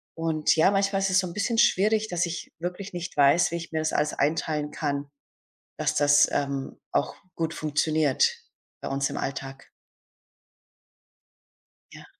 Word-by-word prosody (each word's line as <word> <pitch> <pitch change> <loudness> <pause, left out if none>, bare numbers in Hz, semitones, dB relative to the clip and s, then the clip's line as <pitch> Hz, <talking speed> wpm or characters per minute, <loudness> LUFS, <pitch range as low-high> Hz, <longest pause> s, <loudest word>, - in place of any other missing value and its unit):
Und 160 -2 +1
ja, 160 +5 +4
manchmal 195 0 +1
ist 195 - +1
es 185 - +4
so 185 - -1
'n 170 - -8
bisschen 210 +4 -1
schwierig, 215 +1 +3
dass 175 -1 0
ich 170 0 -6
wirklich 180 +3 -5
nicht 175 0 -6
weiß, 145 +5 +4
wie - - -2
ich 170 0 -6
mir 160 - -1
das 155 0 -1
alles 150 0 +1
einteilen 150 0 -1
kann, 140 -2 -3 0.7
dass - - 0
das, 145 0 +5
ähm, 140 -1 -3
auch - - 0 0.2
gut 165 -1 -2
funktioniert 155 -1 +1 0.4
bei - - -5
uns 140 0 -1
im - - -5
Alltag. 135 0 -6 2.2
Ja. - - -12
160 Hz, 155 wpm, -26 LUFS, 145-180 Hz, 2.2 s, das